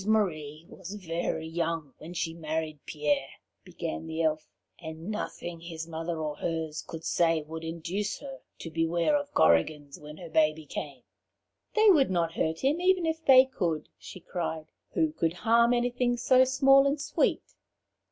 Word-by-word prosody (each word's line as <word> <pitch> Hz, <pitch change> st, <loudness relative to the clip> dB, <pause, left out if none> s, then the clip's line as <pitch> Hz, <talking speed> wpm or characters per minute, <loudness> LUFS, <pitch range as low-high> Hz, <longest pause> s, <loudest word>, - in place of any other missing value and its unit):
"Rose 190 Hz, -, -9 dB
Marie 160 Hz, -8 st, 0 dB
was 190 Hz, +4 st, -9 dB
very 165 Hz, -4 st, -3 dB
young 165 Hz, -3 st, -3 dB
when 160 Hz, -, -9 dB
she 165 Hz, -1 st, -2 dB
married 160 Hz, -1 st, -3 dB
Pierre," 145 Hz, -3 st, -1 dB, 0.3 s
began 80 Hz, +1 st, -5 dB
the 160 Hz, +1 st, -2 dB
Elf, 155 Hz, -1 st, 0 dB, 0.3 s
"and 160 Hz, +4 st, -7 dB
nothing 175 Hz, -5 st, -5 dB
his 165 Hz, -1 st, -7 dB
mother 165 Hz, +1 st, -4 dB
or 150 Hz, -1 st, -3 dB
hers 160 Hz, -2 st, -3 dB
could 165 Hz, 0 st, -9 dB
say 165 Hz, -2 st, +2 dB
would 160 Hz, +2 st, -7 dB
induce 170 Hz, +5 st, -3 dB
her 270 Hz, -2 st, -9 dB, 0.2 s
to 165 Hz, -, -8 dB
beware 165 Hz, -, +1 dB
of 290 Hz, 0 st, -2 dB
Korrigans 140 Hz, -, +2 dB
when 150 Hz, +1 st, -10 dB
her 170 Hz, -3 st, -10 dB
baby 155 Hz, -1 st, +2 dB
came. 140 Hz, -3 st, -6 dB, 0.7 s
'They 435 Hz, -1 st, +7 dB
would 290 Hz, -7 st, +4 dB
not 170 Hz, -3 st, 0 dB
hurt 160 Hz, -1 st, -1 dB
him 290 Hz, +6 st, +1 dB
even 365 Hz, -1 st, +3 dB
if 320 Hz, 0 st, -2 dB
they 260 Hz, -2 st, +8 dB
could,' 170 Hz, -12 st, -2 dB
she 185 Hz, -, -10 dB
cried. 160 Hz, -3 st, -4 dB, 0.2 s
'Who 160 Hz, -1 st, +2 dB
could 165 Hz, +1 st, -1 dB
harm 235 Hz, +5 st, +3 dB
anything 245 Hz, 0 st, +1 dB
so 255 Hz, +2 st, +5 dB
small 270 Hz, +1 st, +5 dB
and 280 Hz, +1 st, 0 dB
sweet?' 285 Hz, -, 0 dB
165 Hz, 165 wpm, -28 LUFS, 160-235 Hz, 0.7 s, they